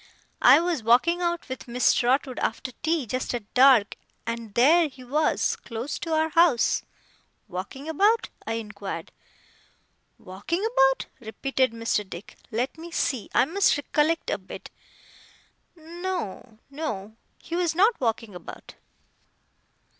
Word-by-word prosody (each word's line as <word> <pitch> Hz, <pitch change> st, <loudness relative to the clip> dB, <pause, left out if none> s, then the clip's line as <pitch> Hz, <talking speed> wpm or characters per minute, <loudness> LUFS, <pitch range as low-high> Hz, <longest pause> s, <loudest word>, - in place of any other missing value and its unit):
I -, -, +8 dB
was 340 Hz, -5 st, -1 dB
walking 255 Hz, +11 st, +3 dB
out 345 Hz, -1 st, -1 dB
with 260 Hz, 0 st, -7 dB
Miss 245 Hz, +1 st, +3 dB
Trotwood 255 Hz, +1 st, +1 dB
after 245 Hz, +3 st, -2 dB
tea, 320 Hz, -3 st, 0 dB
just 255 Hz, +2 st, -3 dB
at 215 Hz, -4 st, -8 dB
dark, 255 Hz, -5 st, +5 dB, 0.3 s
and 230 Hz, -2 st, -5 dB
there 315 Hz, +7 st, +5 dB
he 260 Hz, -2 st, -13 dB
was, 300 Hz, +5 st, +1 dB
close 235 Hz, +4 st, -6 dB
to 330 Hz, -, -5 dB
our 315 Hz, 0 st, +2 dB
house.' 330 Hz, -6 st, +3 dB, 0.7 s
'Walking 200 Hz, -, -7 dB
about?' 405 Hz, +8 st, +2 dB, 0.2 s
I 225 Hz, -, -1 dB
inquired. 205 Hz, -6 st, -6 dB, 1.1 s
'Walking 205 Hz, -, -4 dB
about?' 270 Hz, -, +3 dB
repeated 260 Hz, +2 st, -1 dB
Mr. 230 Hz, -2 st, -1 dB
Dick. 180 Hz, +3 st, -9 dB
'Let 250 Hz, +6 st, -2 dB
me 335 Hz, +1 st, -8 dB
see, 265 Hz, -8 st, -1 dB
I -, -, +5 dB
must 365 Hz, +2 st, +2 dB
recollect 300 Hz, +3 st, 0 dB
a -, -, -1 dB
bit. -, -, -10 dB, 1.1 s
N 335 Hz, +2 st, -11 dB
no, 290 Hz, -, -4 dB
no; 220 Hz, -9 st, -5 dB, 0.2 s
he 335 Hz, -, -6 dB
was 345 Hz, -2 st, 0 dB
not 415 Hz, -, +3 dB
walking 225 Hz, -3 st, -1 dB
about. 180 Hz, -2 st, -10 dB
265 Hz, 135 wpm, -25 LUFS, 230-330 Hz, 1.1 s, I